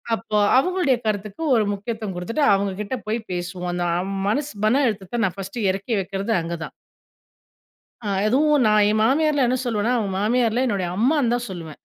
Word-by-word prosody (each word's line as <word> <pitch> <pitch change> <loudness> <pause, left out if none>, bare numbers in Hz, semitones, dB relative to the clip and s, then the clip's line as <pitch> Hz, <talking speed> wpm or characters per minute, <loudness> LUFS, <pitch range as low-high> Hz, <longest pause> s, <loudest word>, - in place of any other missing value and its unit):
அப்போ 220 -1 -3 0.2
அவங்களுடைய 355 -4 +2
கருத்துக்கு 210 +7 -3
ஒரு 220 -2 +2
முக்கியத்துவம் 210 -1 -5
குடுத்துட்டு 230 +12 0
அவங்க 195 0 -1
கிட்ட 210 +5 -3
போய்ப் 225 0 -2
பேசுவோம். 180 0 -4
அந்த 175 0 -1 0.4
மனசு 285 +5 -1
மன 265 +6 +3
அழுத்தத்தை 210 +1 -3
நான் 185 0 -3
ஃபர்ஸ்ட் 195 +4 -6
இறக்கி 200 +5 -1
வைக்கிறது 195 +4 -3
அங்கதான். 165 -1 -6 1.3
அ - - -2 0.2
எதுவும் 290 +1 +3
நான் 210 -1 +4
என் 215 - +1
மாமியார 285 0 +2
என்ன 255 0 0
சொல்லுவேன்னா, 230 +2 0
அவங்க 200 -3 -2
மாமியார் 230 +1 +2
இல்ல, 255 +2 +2
என்னுடைய 190 -5 -1
அம்மான்னுதான் 245 -3 +1
சொல்லுவேன். 165 -4 -8
215 Hz, 160 wpm, -22 LUFS, 195-250 Hz, 1.3 s, நான்